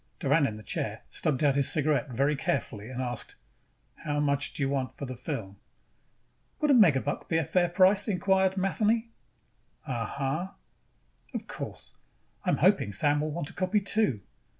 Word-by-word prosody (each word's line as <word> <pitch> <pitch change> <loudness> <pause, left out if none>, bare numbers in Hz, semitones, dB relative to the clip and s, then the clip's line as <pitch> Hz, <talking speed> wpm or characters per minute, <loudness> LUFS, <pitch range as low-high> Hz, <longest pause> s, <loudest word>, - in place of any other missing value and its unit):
Doran 145 -1 +3
in 110 - -5
the 110 - -11
chair - - -4
stubbed 150 -2 -1
out 145 -2 +4
his 140 -1 +2
cigarette, 150 -2 +1
very 140 +5 +1
carefully, 120 -5 -3
and 130 0 -4
asked, 120 -2 -5 0.6
"How 145 -1 -2
much 145 -1 +1
do 145 - -3
you - - +2
want 130 -2 -2
for 140 - -5
that 130 -2 -7
film?" 100 -2 -5 1.0
"Would 300 -2 +3
a - - +7
megabuck 155 - +3
be 165 - +2
a 165 - +2
fair 175 +4 +2
price?" 190 +4 +4
inquired 190 -1 +2
Matheny. 220 +4 +1 0.7
"Uh... 120 -3 -2
huh." 140 - -2 0.9
"Of - - -3
course, - - -7 0.5
I - - -1
am - - +2
hoping 100 - +3
Sam 145 +9 +2
will 155 0 -2
want 160 -1 -4
a - - -18
copy 185 +3 +1
too." 200 - +1
145 Hz, 175 wpm, -28 LUFS, 130-185 Hz, 1.0 s, a